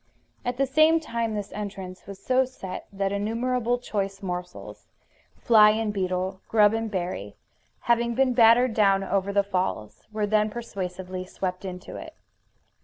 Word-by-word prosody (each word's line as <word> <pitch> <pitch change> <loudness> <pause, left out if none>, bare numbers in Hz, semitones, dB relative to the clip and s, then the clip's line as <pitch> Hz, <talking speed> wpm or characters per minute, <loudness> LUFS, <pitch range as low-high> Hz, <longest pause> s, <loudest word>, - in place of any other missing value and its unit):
At 245 0 -2
the 275 - +2
same 310 +4 +4
time 230 -7 -3
this 205 -1 -5
entrance 195 -3 -7
was 200 -1 -8
so 260 0 +3
set 220 -8 -8
that 195 0 -1
innumerable 235 +4 0
choice 200 -4 -4
morsels, 180 -1 -6 0.5
fly 215 -2 +6
and 215 0 0
beetle, 185 0 -2
grub 210 -1 +4
and 225 0 -2
berry, 175 - -4 0.5
having 235 0 +1
been 265 0 +3
battered 235 +1 +5
down 195 -3 +3
over 195 0 -1
the 200 0 +3
falls, 180 - -3
were 215 -1 -1
then 215 +1 +2
persuasively 185 -5 -5
swept 185 0 -4
into 180 -1 -7
it. - - -10
205 Hz, 150 wpm, -26 LUFS, 190-235 Hz, 0.5 s, fly